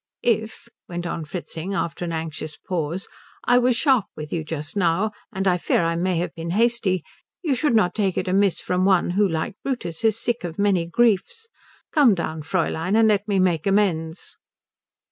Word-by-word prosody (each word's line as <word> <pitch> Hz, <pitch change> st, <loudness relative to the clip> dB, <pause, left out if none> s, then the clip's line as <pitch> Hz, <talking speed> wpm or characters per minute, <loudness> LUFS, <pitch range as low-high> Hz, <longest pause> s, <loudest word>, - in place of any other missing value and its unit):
"If," 220 Hz, -1 st, -1 dB, 0.2 s
went 175 Hz, 0 st, -4 dB
on 165 Hz, -2 st, -3 dB
Fritzing 175 Hz, +3 st, -5 dB
after 170 Hz, -2 st, -2 dB
an 170 Hz, -, -3 dB
anxious 160 Hz, -1 st, -5 dB
pause, 175 Hz, -1 st, -3 dB, 0.4 s
"I 245 Hz, 0 st, +5 dB
was 250 Hz, 0 st, +3 dB
sharp 255 Hz, -5 st, +3 dB
with 150 Hz, 0 st, -6 dB
you 165 Hz, -, -1 dB
just 150 Hz, 0 st, -5 dB
now 190 Hz, +3 st, +1 dB, 0.2 s
and 195 Hz, -2 st, -2 dB
I 180 Hz, -1 st, +3 dB
fear 170 Hz, -, +1 dB
I 165 Hz, 0 st, 0 dB
may 180 Hz, +1 st, 0 dB
have 175 Hz, -, -2 dB
been 165 Hz, 0 st, -6 dB
hasty 230 Hz, -6 st, +2 dB, 0.4 s
you 305 Hz, -5 st, +1 dB
should 255 Hz, -1 st, +1 dB
not 180 Hz, -5 st, +3 dB
take 195 Hz, -4 st, 0 dB
it 185 Hz, -, -1 dB
amiss 195 Hz, 0 st, +2 dB
from 180 Hz, 0 st, 0 dB
one 190 Hz, -2 st, +3 dB
who, 200 Hz, +3 st, +3 dB
like 165 Hz, +3 st, -3 dB
Brutus, 235 Hz, -11 st, -4 dB
is 225 Hz, 0 st, +2 dB
sick 240 Hz, -1 st, -2 dB
of 170 Hz, -2 st, -5 dB
many 195 Hz, -4 st, +2 dB
griefs. 240 Hz, -, +1 dB, 0.4 s
Come 270 Hz, -9 st, +5 dB
down, 160 Hz, -2 st, -3 dB
Fräulein, 165 Hz, +3 st, -1 dB
and 225 Hz, -1 st, +5 dB
let 205 Hz, -1 st, +2 dB
me 200 Hz, -2 st, +1 dB
make 180 Hz, -2 st, +2 dB
amends." 175 Hz, -5 st, 0 dB
185 Hz, 185 wpm, -23 LUFS, 165-215 Hz, 0.4 s, I